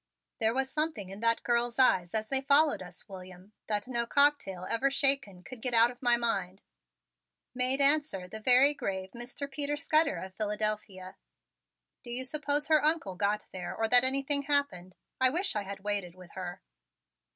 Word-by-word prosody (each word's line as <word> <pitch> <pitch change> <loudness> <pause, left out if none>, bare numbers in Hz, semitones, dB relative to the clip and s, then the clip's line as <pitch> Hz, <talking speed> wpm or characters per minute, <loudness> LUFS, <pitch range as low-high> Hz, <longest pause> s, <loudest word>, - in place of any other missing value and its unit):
"There 225 0 +1
was 265 0 0
something 305 - -2
in 195 - -9
that 230 0 0
girl's 240 0 0
eyes 185 -8 +3
as 215 0 -2
they 270 -1 +1
followed 285 0 +3
us, 180 +3 -9
William, 185 0 -12
that 210 +1 -2
no 235 -2 -1
cocktail 280 -12 +2
ever 250 +4 +1
shaken 275 -9 0
could 240 +4 -10
get 245 -1 0
out 230 +1 +5
of 245 - -17
my 240 -2 +3
mind," 195 -5 -3 0.9
made 255 +2 +2
answer 280 -10 +3
the 220 +4 -8
very 255 +5 +5
grave 190 -7 -5
Mr. 245 +4 -6
Peter 290 +1 -3
Scudder 310 0 +1
of 190 0 -8
Philadelphia. 210 -2 -4 0.9
"Do 240 - -10
you 250 +2 -2
suppose 295 +1 -2
her 310 -2 +3
Uncle 310 - +1
got 205 +3 -1
there 180 -2 -6
or 225 - 0
that 245 +1 +6
anything 275 +2 +1
happened? 280 -11 -2 0.2
I 260 0 +6
wish 345 - -1
I 210 - -1
had 200 0 -8
waited 200 -4 -2
with 180 -2 -15
her." 180 -2 -8
235 Hz, 175 wpm, -29 LUFS, 195-275 Hz, 0.9 s, that